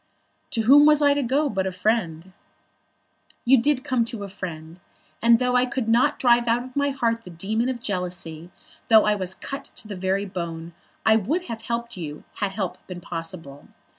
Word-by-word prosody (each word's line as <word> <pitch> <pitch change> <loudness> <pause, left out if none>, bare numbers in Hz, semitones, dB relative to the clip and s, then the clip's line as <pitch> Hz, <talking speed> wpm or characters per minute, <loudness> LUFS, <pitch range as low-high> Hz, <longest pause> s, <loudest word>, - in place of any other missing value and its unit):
"To 230 - -1
whom 285 +6 +7
was 300 -1 +5
I 285 0 +5
to 285 - 0
go 275 +4 +1
but 195 -8 -1
to 190 - -1
a - - -7
friend?" 185 -3 -1 1.1
"You 255 0 +5
did 280 -1 +1
come 255 -5 +1
to 230 -3 -5
a 200 - -6
friend, 170 -3 -8 0.4
and 230 0 +6
though 250 +1 0
I 250 0 +3
could 245 -2 -3
not 235 +2 +3
drive 240 -1 +3
out 235 +1 +2
of 255 0 -12
my 285 0 +1
heart 230 -4 -1
the - - -11
demon 215 +8 -1
of 255 -2 -3
jealousy, 175 -5 -4 0.4
though 220 -2 +6
I 210 - +3
was 190 -2 -2
cut 275 +6 -7
to - - -8
the 205 - -6
very 190 +2 -1
bone, 170 -3 -6 0.3
I 220 0 +6
would 290 - -1
have 225 -1 -5
helped 235 -1 -4
you 155 -3 -7
had 200 -2 -2
help 190 -3 -3
been 180 -1 -7
possible. 165 -4 -7
220 Hz, 200 wpm, -24 LUFS, 180-250 Hz, 1.1 s, whom